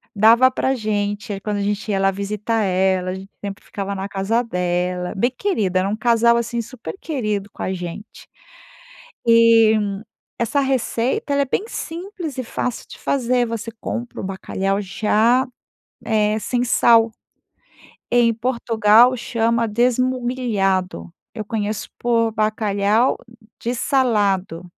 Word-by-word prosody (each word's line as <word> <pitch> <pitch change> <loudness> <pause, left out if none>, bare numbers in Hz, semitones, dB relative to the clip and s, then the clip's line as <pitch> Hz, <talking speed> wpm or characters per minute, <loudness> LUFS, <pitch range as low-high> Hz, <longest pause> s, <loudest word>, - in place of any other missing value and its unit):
dava 230 +5 +6
pra 260 +1 0
gente, 205 -2 -2
aí 195 - -6
quando 210 0 -2
a - - -2
gente 205 +1 -2
ia 195 - +1
lá 195 0 +3
visitar 210 +3 -2
ela, 185 -1 +1
a - - -4
gente 190 +1 -10
sempre 200 +1 -6
ficava 200 0 -5
na 195 0 -4
casa 200 +4 0
dela. 180 -3 -2
Bem 240 +6 +2
querida, 205 - 0
era 190 +1 0
um 210 - -1
casal 235 +1 +3
assim 235 0 -2
super 235 - -8
querido 215 -10 -3
com - - -11
a 190 - -1
gente. 180 +4 -8 1.0
E, 230 -1 +6 0.6
essa 235 +5 +1
receita, 265 0 -1
ela 280 - +2
é - - -4
bem 385 +10 -2
simples 345 - -6
e 255 - -2
fácil 245 +1 -4
de - - -10
fazer, 250 -2 +1
você 230 0 -5
compra 240 0 -5
o - - -7
bacalhau 195 +1 -2
já, 220 +5 +2 0.6
eh, 215 -1 +1
sem 245 +2 -1
sal. 230 -1 +4 1.0
Em 240 -1 +4
Portugal 230 0 +3
chama, 230 -1 0
desmugliado 235 - 0 0.2
eu 215 - -5
conheço 210 0 -3
por 230 -1 +1
bacalhau 215 +1 +1 0.4
de 240 +2 -2
salado. 205 - +1
220 Hz, 140 wpm, -21 LUFS, 200-240 Hz, 1.0 s, dava